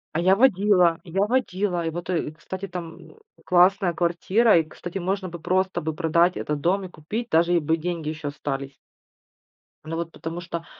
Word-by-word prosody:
А - - +2
я 185 +3 +4
водила 195 -7 +4
я 190 +2 -2
водила. 200 -7 0
И - - 0
вот, 175 +2 -6
э, 165 -4 -1
кстати, 190 +4 -7
там 175 - -9 0.3
классная 180 0 +4
квартира, 180 +6 +3
и, 165 - +3
кстати, 175 +4 -8
можно 190 +1 -2
бы 170 0 -8
просто 185 +3 0
бы 160 +1 -2
продать 170 +3 +2
этот 150 -1 -3
дом 190 +5 +1
и - - -8
купить, 210 +10 -5
даже 170 +2 +3
и - - +4
бы 160 +2 0
деньги 165 -2 -3
ещё 155 -2 -4
остались. 140 -1 -5 1.1
Ну 165 +1 -5
вот 165 0 -4
потому 165 +2 -6
что, 170 -1 -6
175 Hz, 185 wpm, -24 LUFS, 165-190 Hz, 1.1 s, я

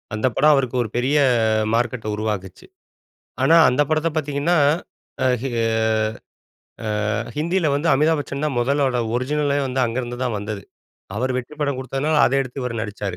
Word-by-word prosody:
அந்த 110 - +1
படம் 150 +1 +5
அவருக்கு 130 -2 -1
ஒரு 110 - -6
பெரிய 130 +5 +1 0.6
மார்க்கெட்ட 120 -1 -1
உருவாக்கிச்சு. 105 -4 -4 0.8
ஆனா, 165 - +5
அந்த 130 +4 +2
படத்த 155 +1 +2
பார்த்திங்கன்னா 150 +3 0 0.6
அஹ் 130 -1 +3 1.8
ஆ - - 0 0.2
ஹிந்தியில 170 +2 +1
வந்து 145 +4 0
அமிதாப் 155 +3 +3
பச்சன் 140 0 -4
தான் 150 -3 -1
முதலோட 135 +1 +1 0.2
ஒரிஜினலே 145 +3 0
வந்து 130 0 -1
அங்கேருந்துதான் 120 0 -2
வந்தது. 105 -1 -5 0.5
அவர் 130 +3 -1
வெற்றி 130 +3 -5
படம் 140 -2 0
குடுத்ததுனால, 135 +4 -1
அத - - -1
எடுத்து 130 +1 -5
இவரு 125 -2 -3
நடிச்சாரு. 100 -3 -5
130 Hz, 140 wpm, -21 LUFS, 120-150 Hz, 1.8 s, படம்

